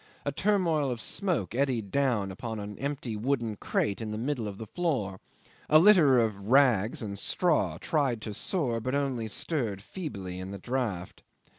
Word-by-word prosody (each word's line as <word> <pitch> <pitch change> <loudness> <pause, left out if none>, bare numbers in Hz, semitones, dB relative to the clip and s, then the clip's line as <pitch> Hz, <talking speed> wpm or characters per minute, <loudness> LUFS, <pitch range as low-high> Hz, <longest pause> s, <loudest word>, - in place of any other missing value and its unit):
A 145 - 0
turmoil 170 -5 +1
of 120 -2 -3
smoke 155 - -1
eddied 120 -6 0
down 120 -9 +1
upon 110 +3 -5
an 105 0 -6
empty 135 -4 -3
wooden 115 -1 -1
crate 100 +1 -1
in 110 - -4
the 105 - -3
middle 120 -1 -2
of 100 -1 -6
the 110 - -6
floor, 115 - -2 0.5
a 155 - +8
litter 165 -7 +7
of 105 -4 0
rags 120 -5 +4
and 100 -2 -4
straw 170 - +1
tried 140 -8 0
to 105 - -4
soar, 125 - -1
but 130 +4 -1
only 135 -5 -1
stirred 110 - -2
feebly 100 - -6
in 95 +1 -6
the 100 - -6
draught. 105 -5 -3
120 Hz, 170 wpm, -29 LUFS, 105-145 Hz, 0.5 s, a